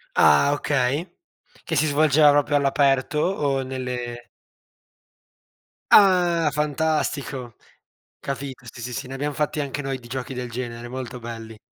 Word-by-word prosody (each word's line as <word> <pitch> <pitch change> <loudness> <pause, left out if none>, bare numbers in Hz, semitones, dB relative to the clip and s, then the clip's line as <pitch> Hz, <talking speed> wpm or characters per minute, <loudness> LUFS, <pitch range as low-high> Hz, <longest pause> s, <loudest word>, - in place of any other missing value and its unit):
Ah, 75 - +5
okay, 145 +4 0 0.5
che - - -3
si 155 - +3
svolgeva 150 0 +5
proprio 145 0 +3
all'aperto? 140 +1 +2
O 145 -6 0
nelle 125 -2 -5 1.7
Ah! 175 -5 +5
Fantastico, 150 -4 -2 0.6
capito. 135 -2 -6
Sì, 120 - -11
sì, 125 +1 -5
sì, 125 - -5
ne 130 - -8
abbiam 145 +2 -2
fatti 150 +1 -1
anche 140 0 -4
noi 135 -1 -3
di 120 - -14
giochi 130 +1 -5
del 125 -1 -5
genere, 120 0 -5
molto 125 -1 -6
belli. 115 -2 -8
135 Hz, 135 wpm, -23 LUFS, 125-150 Hz, 1.7 s, Ah